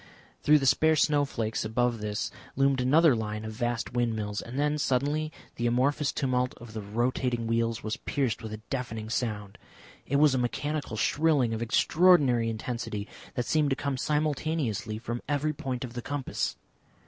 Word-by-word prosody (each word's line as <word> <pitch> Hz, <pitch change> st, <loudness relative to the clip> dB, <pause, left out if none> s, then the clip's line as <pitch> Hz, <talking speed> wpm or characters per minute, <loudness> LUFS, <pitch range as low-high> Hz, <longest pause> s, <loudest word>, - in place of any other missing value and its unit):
Through 150 Hz, +1 st, +6 dB
the 135 Hz, -, -1 dB
spare 160 Hz, +4 st, +4 dB
snowflakes 140 Hz, -7 st, +1 dB
above 115 Hz, +2 st, 0 dB
this 105 Hz, 0 st, -2 dB, 0.2 s
loomed 135 Hz, -1 st, +3 dB
another 150 Hz, +2 st, +5 dB
line 105 Hz, -1 st, -3 dB
of 110 Hz, -, -4 dB
vast 120 Hz, +1 st, -2 dB
windmills, 110 Hz, -4 st, -1 dB
and 120 Hz, +3 st, -7 dB
then 150 Hz, +1 st, +1 dB
suddenly 145 Hz, +4 st, 0 dB, 0.3 s
the 120 Hz, -, 0 dB
amorphous 140 Hz, +5 st, +2 dB
tumult 125 Hz, -2 st, 0 dB
of 120 Hz, -2 st, -11 dB
the 110 Hz, -, -4 dB
rotating 120 Hz, +3 st, -1 dB
wheels 115 Hz, 0 st, 0 dB
was 110 Hz, 0 st, -2 dB
pierced 130 Hz, -6 st, -1 dB
with 110 Hz, -, -6 dB
a 110 Hz, -, -4 dB
deafening 115 Hz, -4 st, -4 dB
sound. 105 Hz, -5 st, -3 dB, 0.5 s
It 140 Hz, -, -1 dB
was 145 Hz, -1 st, +5 dB
a 130 Hz, -, +1 dB
mechanical 140 Hz, 0 st, -2 dB
shrilling 145 Hz, -2 st, +2 dB
of 110 Hz, -, -3 dB
extraordinary 130 Hz, -2 st, +4 dB
intensity 110 Hz, -2 st, -4 dB, 0.3 s
that 125 Hz, -, -1 dB
seemed 150 Hz, +1 st, +2 dB
to 135 Hz, -, +1 dB
come 140 Hz, 0 st, -2 dB
simultaneously 150 Hz, -, -1 dB
from 120 Hz, +1 st, -4 dB
every 150 Hz, +1 st, +1 dB
point 130 Hz, -3 st, -4 dB
of 120 Hz, -2 st, -6 dB
the 120 Hz, -, -4 dB
compass. 145 Hz, +1 st, -2 dB
125 Hz, 165 wpm, -28 LUFS, 115-145 Hz, 0.5 s, Through